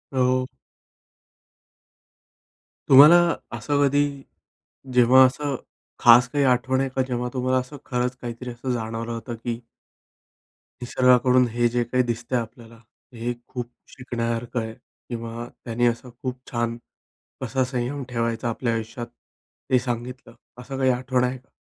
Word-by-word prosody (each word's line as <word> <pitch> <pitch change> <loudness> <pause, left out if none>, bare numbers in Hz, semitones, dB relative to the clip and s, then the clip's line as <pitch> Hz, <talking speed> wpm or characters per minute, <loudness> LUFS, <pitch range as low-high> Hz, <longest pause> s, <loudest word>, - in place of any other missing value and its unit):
हो. 130 0 +2 2.4
तुम्हाला 145 +5 +9 0.4
असं 145 +6 0
कधी, 145 0 0 0.7
जेव्हा 125 +2 +7
असं 140 +2 -1 0.4
खास 120 +1 +7
काही 145 -1 +1
आठवण 130 +1 +2
येत, 135 0 -3
जेव्हा 125 0 -2
तुम्हाला 130 0 +1
असं 130 +3 -7
खरंच 125 -1 -1
काहीतरी 120 +1 -6
असं 120 +2 -4
जाणवलं 115 0 -3
होतं? 115 +1 -5
की 115 +1 -4 1.2
निसर्गाकडून 125 0 +4
हे 120 0 +2
जे 120 0 0
काही 125 +2 +1
दिसत 120 +1 -4
आहे 120 - +3
आपल्याला, 115 0 -11 0.4
हे 120 +1 -3
खूप 120 -2 -6 0.2
शिकण्यासारखं 120 -1 -3
आहे 110 0 -4
किंवा 115 -1 -8 0.2
त्यांनी 120 +1 +1
अस 115 0 0
खूप 125 +1 -7
छान, 120 -1 -1 0.6
कसा 130 +1 0
संयम 130 +2 -3
ठेवायचा. 115 -1 -1
आपल्या 115 0 -1
आयुष्यात 115 +2 -4 0.6
हे 125 - +5
सांगितलं, 120 0 -5 0.3
असं 135 +1 -7
काही 130 -1 +3
आठवण 125 0 0
आहे 125 +1 -1
का? 130 - -24
125 Hz, 130 wpm, -24 LUFS, 115-130 Hz, 2.4 s, तुम्हाला